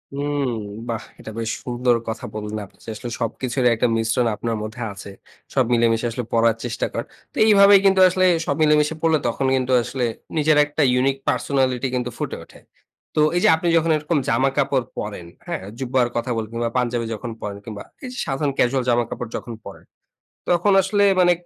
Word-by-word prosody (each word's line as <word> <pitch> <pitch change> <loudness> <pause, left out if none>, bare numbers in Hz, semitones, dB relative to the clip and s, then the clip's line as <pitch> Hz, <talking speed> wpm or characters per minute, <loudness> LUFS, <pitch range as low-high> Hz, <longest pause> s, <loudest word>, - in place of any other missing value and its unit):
উম 145 -1 -1 0.4
বাহ! 115 -2 -2 0.2
এটা 110 - -8
বেশ 115 -1 -2
সুন্দর 125 0 +1
কথা 110 - -5
বললেন 105 0 -4
আপনি - - -23
যে - - -8
আসলে 120 +2 -6
সবকিছুরই 125 +2 0
একটা 120 +2 +1
মিশ্রণ 115 +2 +1
আপনার 115 +1 -3
মধ্যে 110 +3 -7
আছে। 100 0 -10 0.4
সব 130 -3 +3
মিলেমিশে 115 0 +2
আসলে 120 +2 -4
পরার 115 -1 +3
চেষ্টা 115 -2 -2
করেন। - - -4 0.3
তো - - -11
এইভাবেই 200 -1 +7
কিন্তু 195 -1 +5
আসলে 185 +1 +2 0.2
সব 145 - 0
মিলেমিশে 150 0 +3
পরলে, 160 -1 +3
তখন 125 +3 -1
কিন্তু 130 0 -1
আসলে 125 +1 -2 0.3
নিজের 155 0 +3
একটা 150 +1 -3
ইউনিক 135 +2 +2
পার্সোনালিটি 130 -2 0
কিন্তু 125 0 -1
ফুটে - - -4
ওঠে। - - -17 0.6
তো - - +2 0.2
এই 175 - +2
যে - - +6
আপনি 175 +2 -3
যখন 165 0 +2
এরকম 150 +1 -1
জামা 130 +4 +3
কাপড় 135 -3 +1
পরেন, 100 -4 -5 0.2
হ্যাঁ? - - -4 0.2
জুব্বার 130 -1 +1
কথা 120 +1 -1
বলব 110 0 -4
না - - +1
পাঞ্জাবি 120 -1 0
যখন 115 +2 -6
পরেন, 100 -1 -5
কিংবা 105 -3 -7 0.2
এই 255 - -5
যে - - -9
সাধারণ 140 +1 -1
ক্যাজুয়াল 130 +1 +2
জামা 120 0 +3
কাপড় 120 -2 -5
যখন 120 - -7
পরেন, - - -10 0.7
তখন 175 +3 +3
আসলে 205 +2 +2 0.2
মানে 175 0 +5
125 Hz, 190 wpm, -22 LUFS, 115-150 Hz, 0.7 s, এইভাবেই